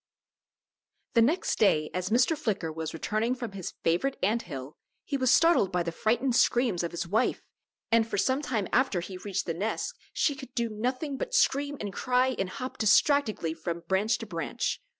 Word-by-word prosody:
The 230 - +5
next 310 +11 +1
day 155 -8 +3
as 185 0 -2
Mr. 250 +8 +3
Flicker 200 - -2
was 160 0 -4
returning 215 +8 -1
from 240 -4 -5
his 190 -3 -6
favorite 175 +12 +1
ant 220 +5 +2
hill, 140 - -8 0.3
he 285 - -2
was 260 -2 +1
startled 330 - +4
by 180 -2 0
the 170 - -3
frightened 235 +7 +1
screams 235 -9 +3
of 170 - -2
his 170 0 -4
wife, 210 +6 +1 0.5
and 230 -1 +4
for - - -3
some 260 +8 +1
time 225 -9 -2
after 255 -7 +2
he 185 +1 -7
reached 195 0 -3
the 165 - -2
nest 205 +7 -2 0.2
she 295 - +1
could 265 -2 -11
do 235 -2 0
nothing 255 +6 -2
but - - -3
scream 285 - +2
and 205 -2 -5
cry 255 +2 +1
and 190 -1 -1
hop 255 +7 -6
distractedly 215 - +3
from 165 +1 -4
branch 190 +6 +1
to - - -7
branch. - - -3
220 Hz, 190 wpm, -28 LUFS, 180-260 Hz, 0.5 s, The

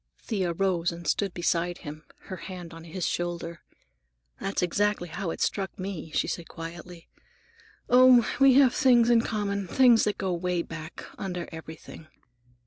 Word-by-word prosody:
Thea 190 -6 -2
rose 175 -2 0
and 170 0 -9
stood 195 +5 0
beside 175 0 -1
him, 155 +1 -8 0.2
her 185 - -8
hand 180 -3 -8
on 165 0 -11
his 170 +2 -4
shoulder. 170 -1 -3 0.8
"That's 195 -2 -2
exactly 200 0 0
how 190 +1 -4
it - - -5
struck 195 -2 -1
me," 185 -4 -5
she - - 0
said 170 - -4
quietly. 170 +1 -9 0.8
"Oh, 250 -1 +6
we 270 -2 +6
have 270 -3 +6
things 240 -4 +4
in 230 -1 +5
common, 200 -4 -2
things 240 +2 +5
that 210 - -1
go 190 - -2
away 180 0 -1
back, 160 0 -9
under 180 -3 -4
everything. 160 -1 -10
180 Hz, 155 wpm, -27 LUFS, 170-205 Hz, 0.8 s, Oh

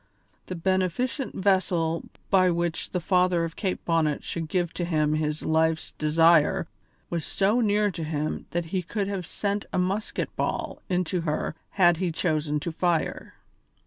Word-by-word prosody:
The 185 - -4
beneficent 190 - -1
vessel 180 -4 +1 0.2
by 185 -2 +5
which 170 -1 -1
the 180 - -1
father 180 -1 +2
of 165 0 -4
Kate 190 -4 -3
Bonnet 160 -3 +1
should 165 -2 -4
give 175 -2 0
to 175 - -3
him 155 -3 +1
his 155 0 -1
life's 160 0 +1
desire 160 +1 +4 0.5
was 170 -2 -1
so 205 +9 +1
near 210 -1 +2
to 170 - -5
him 155 -1 -3
that 175 0 -2
he 185 - +1
could 195 +4 -3
have 190 -4 -3
sent 205 0 -2
a - - -1
musket 190 +4 -1
ball - - -2
into 180 -1 0
her 155 -2 -1 0.2
had 175 -3 +5
he 180 -1 -1
chosen 155 -3 0
to 170 - -3
fire. 170 0 -1
175 Hz, 160 wpm, -26 LUFS, 160-185 Hz, 0.5 s, by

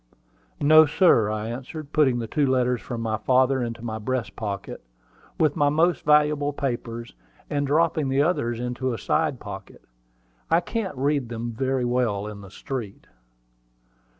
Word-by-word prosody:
"No, 155 +1 +7
sir," 145 - +4
I 110 0 -3
answered, 135 +5 -7
putting 135 -5 +3
the 120 - -3
two 140 +5 0
letters 125 -2 +1
from 120 -2 -5
my 110 -1 -1
father 130 +3 +2
into 115 -1 -4
my 110 -1 -4
breast 125 +2 -3
pocket, 100 -3 -5 0.6
with 155 -2 +3
my 145 -1 +3
most 165 +3 +2
valuable 150 -1 +3
papers, 120 -4 -4 0.4
and 145 -1 0
dropping 155 -1 +2
the 135 +2 +3
others 120 -9 0
into 125 +1 -2
a - - -6
side - - 0
pocket. - - -9 0.7
"I 165 - +4
can't 190 - -4
read 140 -2 0
them 120 0 -4
very 130 +2 -1
well 120 -5 0
in 105 -1 -8
the 100 - -11
street." 110 0 -6
130 Hz, 155 wpm, -24 LUFS, 115-145 Hz, 0.7 s, No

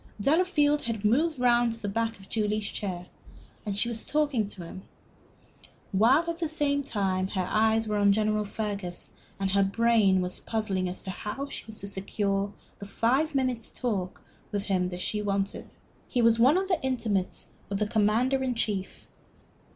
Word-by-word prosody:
Delafield 295 - +3
had 225 -3 -3
moved 290 +7 +2
round 240 -1 +3
to 230 - -9
the 205 - -4
back 225 +2 -1
of 195 - -15
Julie's 215 -1 -1
chair, 180 -4 -4 0.6
and 200 -1 -2
she 210 - +3
was 230 -2 -2
talking 290 -8 +1
to 195 -3 -8
him, 185 - -9 1.1
while 230 - +5
all 335 0 -2
the 300 -4 0
time 190 -7 0
her 185 -2 -2
eyes 220 +2 +2
were 210 -1 0
on 205 0 +5
General 215 +1 +1
Fergus 200 -4 -4 0.3
and 195 -1 0
her 200 +1 +3
brain 200 -1 +3
was 180 0 -1
puzzling 195 -5 -1
as 180 - -5
to 190 - -4
how 210 +9 -5
she - - -7
was 220 0 -5
to 200 - -4
secure 200 0 -1 0.3
the 200 - -8
five 265 +9 +1
minutes' 255 -4 0
talk 200 -7 -3 0.3
with 205 -2 -1
him 185 -3 0
she 210 +3 -2
wanted. 200 -1 -2 0.3
He 245 - +1
was 230 0 +5
one 265 +8 +6
of 380 0 0
the 360 -7 0
intimates 225 -8 -1 0.2
of 200 - -1
the 210 - +1
Commander 225 +5 +2
in 255 -2 -1
Chief. 205 -4 -3
215 Hz, 175 wpm, -28 LUFS, 200-250 Hz, 1.1 s, one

